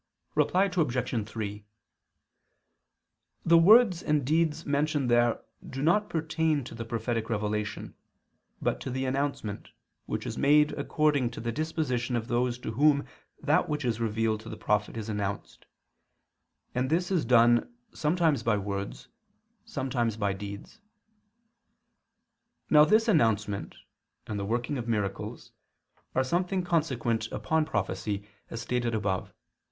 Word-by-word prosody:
Reply 185 Hz, +2 st, +3 dB
Obj. 125 Hz, -, -1 dB
3: 105 Hz, -2 st, -5 dB, 1.8 s
The 170 Hz, 0 st, +6 dB
words 200 Hz, 0 st, +6 dB
and 150 Hz, -3 st, +1 dB
deeds 160 Hz, +2 st, +1 dB
mentioned 145 Hz, -2 st, 0 dB
there 120 Hz, -1 st, +3 dB, 0.3 s
do 135 Hz, +1 st, -4 dB
not 205 Hz, +7 st, +3 dB
pertain 160 Hz, -2 st, 0 dB
to 120 Hz, -, -9 dB
the 115 Hz, 0 st, -5 dB
prophetic 115 Hz, 0 st, -2 dB
revelation, 105 Hz, -1 st, -2 dB, 0.7 s
but -, -, -1 dB
to -, -, -4 dB
the 130 Hz, +1 st, -2 dB
announcement, 135 Hz, -6 st, -2 dB, 0.4 s
which -, -, -3 dB
is -, -, -4 dB
made 150 Hz, +2 st, +5 dB
according 145 Hz, -5 st, +1 dB
to 115 Hz, -, -9 dB
the 115 Hz, 0 st, -2 dB
disposition 130 Hz, -5 st, -1 dB
of 120 Hz, +1 st, -3 dB
those 120 Hz, 0 st, +1 dB
to 125 Hz, -, -5 dB
whom 140 Hz, +4 st, +3 dB, 0.4 s
that 150 Hz, +2 st, +2 dB
which 150 Hz, -2 st, -2 dB
is 115 Hz, -2 st, 0 dB
revealed 110 Hz, -1 st, 0 dB
to -, -, -10 dB
the -, -, -7 dB
prophet 105 Hz, +2 st, 0 dB
is 110 Hz, -1 st, -5 dB
announced; 100 Hz, -2 st, -4 dB, 1.1 s
and 130 Hz, +1 st, 0 dB
this 175 Hz, +4 st, 0 dB
is 180 Hz, -5 st, +2 dB
done 120 Hz, -, +4 dB, 0.2 s
sometimes 155 Hz, -3 st, +1 dB
by 115 Hz, -2 st, +1 dB
words, 100 Hz, 0 st, -5 dB, 0.6 s
sometimes 120 Hz, -4 st, -2 dB
by 100 Hz, -2 st, 0 dB
deeds. 100 Hz, +1 st, -8 dB, 1.9 s
Now 150 Hz, -1 st, +8 dB
this 220 Hz, +5 st, +3 dB
announcement, 110 Hz, -, +1 dB, 0.5 s
and 105 Hz, -1 st, -4 dB
the 100 Hz, -, -3 dB
working 120 Hz, +6 st, -1 dB
of 120 Hz, -, -5 dB
miracles, 105 Hz, -4 st, -3 dB, 0.6 s
are 130 Hz, -, +3 dB
something 180 Hz, +6 st, 0 dB
consequent 130 Hz, -10 st, 0 dB
upon 155 Hz, +9 st, 0 dB
prophecy, 100 Hz, -, -3 dB, 0.2 s
as 115 Hz, -, -5 dB
stated 120 Hz, -2 st, -1 dB
above 100 Hz, -3 st, -1 dB
(Q. -, -, -24 dB
125 Hz, 135 wpm, -28 LUFS, 110-155 Hz, 1.9 s, Now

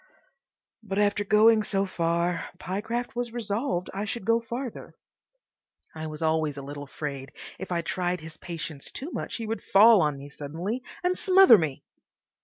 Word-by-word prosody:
But 195 Hz, -3 st, -4 dB
after 205 Hz, 0 st, +2 dB
going 215 Hz, +2 st, +5 dB
so 200 Hz, -2 st, 0 dB
far 170 Hz, -1 st, -1 dB
Pyecraft 225 Hz, +7 st, -3 dB
was 240 Hz, -1 st, -2 dB
resolved 215 Hz, -4 st, -2 dB
I 195 Hz, +2 st, -3 dB
should 210 Hz, -1 st, -4 dB
go 230 Hz, +2 st, +4 dB
farther. 235 Hz, +1 st, -6 dB, 1.0 s
I 160 Hz, 0 st, -5 dB
was 155 Hz, +1 st, -6 dB
always 160 Hz, -2 st, +1 dB
a 140 Hz, -, -6 dB
little 145 Hz, +1 st, -7 dB
afraid 140 Hz, -2 st, -6 dB, 0.3 s
if 190 Hz, -, -7 dB
I 170 Hz, -1 st, 0 dB
tried 180 Hz, +1 st, -1 dB
his 160 Hz, 0 st, -10 dB
patience 160 Hz, -4 st, -5 dB
too 295 Hz, +6 st, -6 dB
much -, -, -4 dB
he 230 Hz, -, -4 dB
would 225 Hz, +1 st, -3 dB
fall 215 Hz, +1 st, +7 dB
on 150 Hz, -3 st, +1 dB
me 140 Hz, +1 st, -10 dB
suddenly 170 Hz, -, -4 dB, 0.2 s
and 360 Hz, +1 st, +2 dB
smother 375 Hz, -, +7 dB
me. 150 Hz, -5 st, -3 dB
190 Hz, 165 wpm, -27 LUFS, 160-225 Hz, 1.0 s, fall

